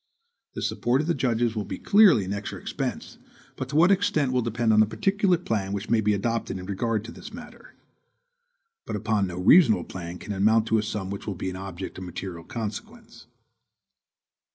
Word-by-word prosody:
The -, -, -4 dB
support 125 Hz, +3 st, +1 dB
of -, -, -3 dB
the 170 Hz, -, +1 dB
judges 120 Hz, -4 st, 0 dB
will 105 Hz, -2 st, -2 dB
clearly 200 Hz, -, +4 dB
be -, -, -4 dB
an 95 Hz, -, -3 dB
extra 100 Hz, 0 st, -5 dB
expense, -, -, -5 dB, 0.4 s
but 130 Hz, -, -5 dB
to 145 Hz, -, -5 dB
what 170 Hz, +5 st, +6 dB
extent 160 Hz, -9 st, +2 dB
will 125 Hz, -1 st, +1 dB
depend 115 Hz, -1 st, +1 dB
on 105 Hz, -, +5 dB
the 110 Hz, -, +5 dB
particular 195 Hz, -, +1 dB
plan 105 Hz, -, -2 dB
which 100 Hz, +2 st, -4 dB
may 115 Hz, -2 st, +4 dB
be 105 Hz, 0 st, +2 dB
adopted 115 Hz, -1 st, -2 dB
in 90 Hz, -, -7 dB
regard 110 Hz, +2 st, -1 dB
to 115 Hz, -, -9 dB
this 225 Hz, -, -11 dB
matter. 245 Hz, +2 st, -12 dB, 1.1 s
But 110 Hz, -, -3 dB
upon 105 Hz, -1 st, 0 dB
no 90 Hz, -1 st, -6 dB
reasonable 110 Hz, -, +5 dB
plan 85 Hz, -1 st, -7 dB
can 105 Hz, -, -6 dB
it -, -, -5 dB
amount 110 Hz, +3 st, +4 dB
to 110 Hz, -, +3 dB
a -, -, +1 dB
sum 105 Hz, -2 st, -4 dB
which 100 Hz, -, -7 dB
will 100 Hz, -, -3 dB
be 95 Hz, +2 st, -4 dB
an -, -, -7 dB
object 95 Hz, -1 st, -7 dB
of -, -, -7 dB
material 90 Hz, -1 st, -7 dB
consequence. 110 Hz, 0 st, -7 dB
110 Hz, 200 wpm, -25 LUFS, 95-125 Hz, 1.1 s, what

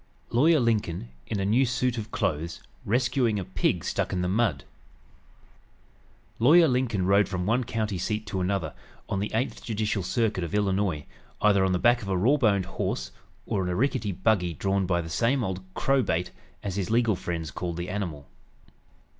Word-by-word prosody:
LAWYER 155 Hz, +6 st, +4 dB
LINCOLN, 105 Hz, -, 0 dB, 0.2 s
IN 105 Hz, -, -2 dB
A 95 Hz, -, 0 dB
NEW 115 Hz, +7 st, +3 dB
SUIT 125 Hz, -1 st, 0 dB
OF 110 Hz, 0 st, -6 dB
CLOTHES, 85 Hz, -1 st, -2 dB, 0.3 s
RESCUING 120 Hz, 0 st, +1 dB
A 95 Hz, -, -3 dB
PIG -, -, 0 dB
STUCK -, -, -1 dB
IN 90 Hz, -1 st, -1 dB
THE -, -, 0 dB
MUD 95 Hz, -, +1 dB, 1.8 s
Lawyer 160 Hz, +8 st, +7 dB
Lincoln 125 Hz, -8 st, 0 dB
rode 100 Hz, 0 st, +4 dB
from 90 Hz, -2 st, -2 dB
one 115 Hz, +5 st, +2 dB
county 110 Hz, -5 st, -2 dB
seat 105 Hz, +3 st, -2 dB
to 95 Hz, -3 st, -3 dB
another, 90 Hz, -4 st, -1 dB, 0.3 s
on 100 Hz, -, -2 dB
the 105 Hz, -, -2 dB
Eighth 115 Hz, +4 st, -2 dB
Judicial 110 Hz, -2 st, -1 dB
Circuit 110 Hz, -1 st, 0 dB
of 85 Hz, +4 st, -3 dB
Illinois, 95 Hz, -6 st, 0 dB, 0.4 s
either 100 Hz, -2 st, +4 dB
on 95 Hz, -, +2 dB
the 90 Hz, -, +2 dB
back 120 Hz, +6 st, +3 dB
of 100 Hz, -, -6 dB
a 95 Hz, -, +1 dB
raw 125 Hz, +11 st, +3 dB
boned 100 Hz, -8 st, +2 dB
horse, 65 Hz, -9 st, -3 dB, 0.3 s
or 100 Hz, -, -1 dB
in 90 Hz, -, -2 dB
a 90 Hz, -, -1 dB
rickety 120 Hz, -2 st, 0 dB
buggy 95 Hz, -3 st, +1 dB
drawn 95 Hz, +1 st, 0 dB
by 85 Hz, -1 st, +1 dB
the 80 Hz, -, -7 dB
same 120 Hz, -, +1 dB
old 95 Hz, -2 st, -3 dB
"crowbait," 125 Hz, -11 st, +1 dB, 0.3 s
as 100 Hz, -1 st, -3 dB
his 95 Hz, -3 st, -2 dB
legal 115 Hz, -2 st, +3 dB
friends 85 Hz, -2 st, -4 dB
called 85 Hz, -1 st, -4 dB
the 85 Hz, +1 st, -4 dB
animal. 85 Hz, -8 st, -4 dB
100 Hz, 180 wpm, -27 LUFS, 90-115 Hz, 1.8 s, Lawyer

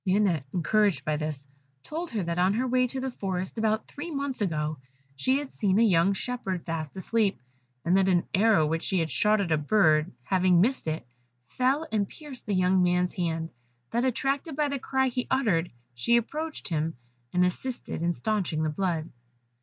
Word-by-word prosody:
Lionette 185 Hz, -7 st, +2 dB
encouraged 200 Hz, +3 st, +2 dB
by 155 Hz, -, +1 dB
this, 150 Hz, -2 st, -4 dB, 0.4 s
told 330 Hz, +3 st, -4 dB
her 220 Hz, -5 st, -2 dB
that, 170 Hz, +1 st, -2 dB
on 185 Hz, +3 st, +3 dB
her 250 Hz, +3 st, +1 dB
way 255 Hz, 0 st, +2 dB
to 265 Hz, +2 st, -4 dB
the 265 Hz, 0 st, -3 dB
forest, 190 Hz, -1 st, -3 dB
about 220 Hz, 0 st, +1 dB
three 295 Hz, +4 st, -7 dB
months 280 Hz, -5 st, -3 dB
ago, 155 Hz, -5 st, -1 dB, 0.4 s
she 260 Hz, -, +2 dB
had 285 Hz, -1 st, -5 dB
seen 195 Hz, -2 st, +1 dB
a 230 Hz, -, +5 dB
young 190 Hz, -3 st, +4 dB
shepherd 195 Hz, -6 st, -3 dB
fast 165 Hz, -1 st, -4 dB
asleep, 205 Hz, -, +1 dB, 0.5 s
and 175 Hz, +2 st, +3 dB
that 190 Hz, 0 st, +4 dB
an 175 Hz, -2 st, +3 dB
arrow 205 Hz, -5 st, +4 dB
which 165 Hz, +2 st, -1 dB
she 190 Hz, -, 0 dB
had 165 Hz, -2 st, 0 dB
shot 210 Hz, 0 st, +3 dB
at 190 Hz, -5 st, -1 dB
a 155 Hz, -, +4 dB
bird 155 Hz, -2 st, +3 dB
having 185 Hz, 0 st, +3 dB
missed 235 Hz, +1 st, +1 dB
it, 155 Hz, -3 st, -2 dB, 0.4 s
fell 265 Hz, -, 0 dB
and 205 Hz, -3 st, 0 dB
pierced 290 Hz, -7 st, -10 dB
the 205 Hz, -, +1 dB
young 185 Hz, 0 st, +3 dB
man's 180 Hz, 0 st, +2 dB
hand; 165 Hz, -3 st, -2 dB, 0.4 s
that 235 Hz, +1 st, +1 dB
attracted 275 Hz, +4 st, -1 dB
by 300 Hz, 0 st, +1 dB
the 280 Hz, -1 st, -2 dB
cry 265 Hz, +1 st, +1 dB
he 250 Hz, 0 st, -2 dB
uttered, 185 Hz, -10 st, +2 dB, 0.2 s
she 120 Hz, -, +3 dB
approached 305 Hz, +6 st, -3 dB
him, 160 Hz, 0 st, -1 dB, 0.4 s
and 180 Hz, 0 st, +3 dB
assisted 240 Hz, +2 st, -3 dB
in 170 Hz, +1 st, +2 dB
stanching 180 Hz, -5 st, -1 dB
the 155 Hz, -, +1 dB
blood. 165 Hz, -1 st, -1 dB
195 Hz, 190 wpm, -27 LUFS, 170-250 Hz, 0.5 s, a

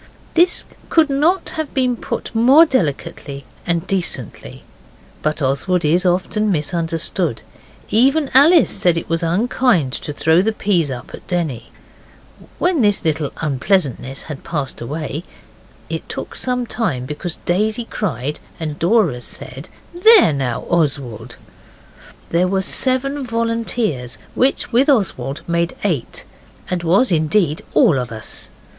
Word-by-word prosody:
This 350 Hz, +2 st, +3 dB, 0.2 s
could 315 Hz, -3 st, +3 dB
not 330 Hz, +7 st, +1 dB
have 315 Hz, -2 st, -5 dB
been 255 Hz, -2 st, +2 dB
put -, -, -5 dB
more 260 Hz, +8 st, +6 dB
delicately 145 Hz, -, -3 dB, 0.2 s
and 170 Hz, -1 st, +1 dB
decently. 190 Hz, -3 st, -4 dB, 0.6 s
But 155 Hz, -1 st, -1 dB
Oswald 150 Hz, +7 st, 0 dB
is 175 Hz, +5 st, +2 dB
often 200 Hz, +4 st, +1 dB
misunderstood. 165 Hz, -, -1 dB, 0.5 s
Even 270 Hz, +6 st, +3 dB
Alice 315 Hz, +5 st, +6 dB
said 180 Hz, -4 st, +2 dB
it 165 Hz, -, -4 dB
was 165 Hz, 0 st, -1 dB
unkind 180 Hz, -, +1 dB
to 150 Hz, -, -4 dB
throw 160 Hz, +3 st, +3 dB
the 220 Hz, +3 st, 0 dB
peas 180 Hz, -8 st, +1 dB
up 125 Hz, -2 st, -7 dB
at -, -, -11 dB
Denny. 155 Hz, -10 st, -2 dB, 0.9 s
When 350 Hz, -5 st, +1 dB
this 205 Hz, -4 st, +2 dB
little 155 Hz, -2 st, 0 dB
unpleasantness 140 Hz, -, 0 dB
had 150 Hz, -4 st, -8 dB
passed 145 Hz, -8 st, -4 dB
away 150 Hz, +4 st, -4 dB, 0.6 s
(it -, -, -6 dB
took -, -, -6 dB
some 250 Hz, -1 st, -1 dB
time 180 Hz, -, -2 dB
because 150 Hz, +5 st, -1 dB
Daisy 215 Hz, +6 st, 0 dB
cried, 150 Hz, -, -3 dB, 0.2 s
and 155 Hz, -3 st, -4 dB
Dora 175 Hz, -, +2 dB
said, 130 Hz, +5 st, -6 dB, 0.2 s
'There 375 Hz, -, +6 dB
now, 130 Hz, -4 st, -2 dB
Oswald!') 135 Hz, -9 st, -2 dB, 1.0 s
there 175 Hz, +2 st, +2 dB
were 190 Hz, +1 st, 0 dB
seven 270 Hz, +6 st, 0 dB
volunteers, 230 Hz, -, -2 dB, 0.2 s
which, 260 Hz, 0 st, +1 dB
with 260 Hz, +5 st, +3 dB
Oswald, 150 Hz, -, 0 dB
made 170 Hz, 0 st, -1 dB
eight, 165 Hz, -, -2 dB, 0.5 s
and 180 Hz, -1 st, -1 dB
was, 190 Hz, +8 st, +3 dB
indeed, 160 Hz, 0 st, +1 dB
all 180 Hz, -, +5 dB
of 125 Hz, -2 st, -4 dB
us. 110 Hz, -1 st, -6 dB
175 Hz, 130 wpm, -19 LUFS, 150-235 Hz, 1.0 s, more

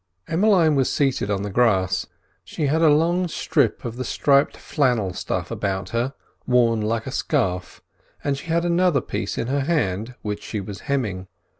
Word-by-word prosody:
Emmeline 170 Hz, -2 st, +3 dB
was 135 Hz, -3 st, +2 dB
seated 135 Hz, -7 st, 0 dB
on 100 Hz, -1 st, -1 dB
the 100 Hz, -, -4 dB
grass; 95 Hz, -5 st, +2 dB, 0.4 s
she 155 Hz, -, -3 dB
had 155 Hz, +4 st, +1 dB
a 160 Hz, -, +6 dB
long 170 Hz, +4 st, +3 dB
strip 160 Hz, -, 0 dB
of 120 Hz, 0 st, -5 dB
the 130 Hz, -, -2 dB
striped 140 Hz, +3 st, +2 dB
flannel 120 Hz, -, 0 dB
stuff -, -, -3 dB
about 95 Hz, -1 st, -2 dB
her, 120 Hz, +4 st, -1 dB, 0.3 s
worn 120 Hz, -3 st, +3 dB
like 110 Hz, +1 st, -1 dB
a 130 Hz, -, -5 dB
scarf, 95 Hz, -, -1 dB, 0.4 s
and 140 Hz, -1 st, 0 dB
she 140 Hz, -, -9 dB
had 170 Hz, +1 st, +1 dB
another 175 Hz, -3 st, +3 dB
piece -, -, -4 dB
in -, -, -1 dB
her 140 Hz, +3 st, 0 dB
hand 125 Hz, -, -1 dB
which 105 Hz, -1 st, -3 dB
she 105 Hz, -, -4 dB
was 100 Hz, 0 st, -7 dB
hemming. 105 Hz, -10 st, -1 dB
125 Hz, 175 wpm, -23 LUFS, 105-150 Hz, 0.4 s, a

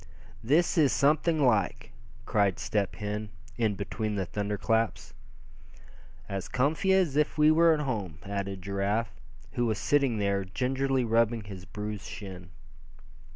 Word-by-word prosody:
"This 160 Hz, +8 st, +3 dB
is 145 Hz, -4 st, +5 dB
something 150 Hz, +1 st, +2 dB
like!" 105 Hz, -7 st, +1 dB, 0.3 s
cried 100 Hz, -3 st, +2 dB
Step 100 Hz, -3 st, -1 dB
Hen, 105 Hz, 0 st, -4 dB, 0.3 s
in 110 Hz, -4 st, 0 dB
between 105 Hz, +2 st, -3 dB
the 95 Hz, -2 st, -1 dB
thunder 105 Hz, +3 st, -3 dB
claps. 115 Hz, +2 st, -1 dB, 1.1 s
"As 95 Hz, -2 st, -4 dB
comfy 155 Hz, +9 st, +1 dB
as 185 Hz, -7 st, +3 dB
if 150 Hz, +1 st, +1 dB
we 150 Hz, 0 st, +6 dB
were 165 Hz, +1 st, +5 dB
at 155 Hz, -2 st, +2 dB
home," 105 Hz, -, -3 dB
added 100 Hz, -1 st, -4 dB
Giraffe, 100 Hz, +3 st, -1 dB, 0.4 s
who 120 Hz, -1 st, 0 dB
was 110 Hz, -2 st, 0 dB
sitting 140 Hz, -4 st, +2 dB
there, 100 Hz, -1 st, 0 dB
gingerly 130 Hz, +6 st, 0 dB
rubbing 115 Hz, -1 st, +2 dB
his 95 Hz, -3 st, -9 dB
bruised 105 Hz, 0 st, -6 dB
shin. 95 Hz, -3 st, -8 dB
110 Hz, 140 wpm, -28 LUFS, 100-135 Hz, 1.1 s, we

